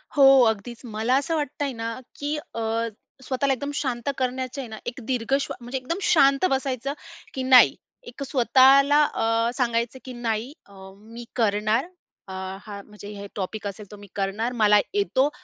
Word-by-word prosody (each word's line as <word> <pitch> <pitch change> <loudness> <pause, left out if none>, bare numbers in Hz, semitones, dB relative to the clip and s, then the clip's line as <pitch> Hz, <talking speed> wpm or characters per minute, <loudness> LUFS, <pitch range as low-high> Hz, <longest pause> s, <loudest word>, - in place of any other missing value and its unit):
हो, 270 -2 +7
अगदीच. 220 +2 -5
मला 225 +2 0
असं 285 +4 0
वाटतंय 290 -2 -2
ना, 230 0 -5 0.2
की 290 +1 -2 0.2
अ, 230 0 -1 0.4
स्वतःला 270 +1 0
एकदम 285 +3 -4
शांत 255 -3 -2
करण्याचं 255 +1 -2
आहे 255 - -7
ना, 220 - -8
1 240 +2 -5
दीर्घ 250 0 -2
श्वा - - -4
म्हणजे 245 +3 -4
एकदम 265 +7 -3
शांत 275 -3 +4
बसायचं, 265 0 -1 0.4
की 260 - -3
नाही, 255 -1 +7 0.3
एक 280 - -7
स्वतःला 275 +2 +5
अ 230 +1 +1
सांगायचं, 235 0 -1
की 255 - -7
"नाही, 235 +2 -3
अ 200 - -19 0.2
मी 225 +4 -11
करणार." 215 +2 +1 0.4
अ, - - -9 0.3
हां, 205 -2 -8
म्हणजे 210 -1 -12
"हे 200 0 -8
टॉपिक 205 +2 -4
असेल 200 +1 -7
तर, 210 - -10
मी 205 - -12
करणार. 205 +4 -1
मला 210 -1 +6 0.2
येतो, 345 -9 +2
245 Hz, 165 wpm, -24 LUFS, 220-270 Hz, 0.4 s, हो